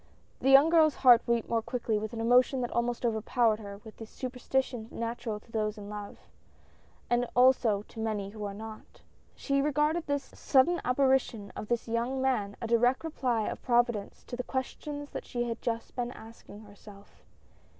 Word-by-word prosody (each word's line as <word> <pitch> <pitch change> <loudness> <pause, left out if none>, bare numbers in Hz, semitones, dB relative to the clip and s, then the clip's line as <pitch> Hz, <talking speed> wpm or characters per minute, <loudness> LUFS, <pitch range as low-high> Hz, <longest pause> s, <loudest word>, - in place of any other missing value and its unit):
The 265 - +1
young 275 +4 +7
girl's 315 -3 +5
heart 245 -1 +7
beat 235 -1 +1
more 230 -1 0
quickly 225 -2 -2
with 215 +1 -5
an 230 - -6
emotion 250 +3 +3
that 245 - -3
almost 240 +1 -1
overpowered 225 0 +1
her 200 -2 -8
with 220 - -12
the 225 - -9
superstition 255 -1 -3
natural 230 -2 -4
to 225 - -22
those 215 -1 -1
in 205 -1 -8
love, 210 -1 -7 0.9
and 240 0 +1
also 245 -5 +4
to 225 - -13
many 210 -3 -2
who 210 0 -8
are 200 -1 -4
not, 220 +1 -10 0.3
she 275 -1 0
regarded 300 +3 +1
this 285 -1 -2
sudden 285 +7 +3
apparition 250 -5 +1
of 210 - -6
this 240 0 -1
young 235 +3 -1
man 230 -7 0
a - - -4
direct 245 +4 +2
reply 250 -8 -1
of - - -5
Providence 240 -4 0
to - - -7
the 250 - -3
questions 290 +3 -5
that - - -6
she 240 -1 -2
had 230 -1 -4
just 230 -1 -3
been 245 -1 -2
asking 220 -2 -13
herself. 205 -1 -16
235 Hz, 180 wpm, -29 LUFS, 220-260 Hz, 0.9 s, young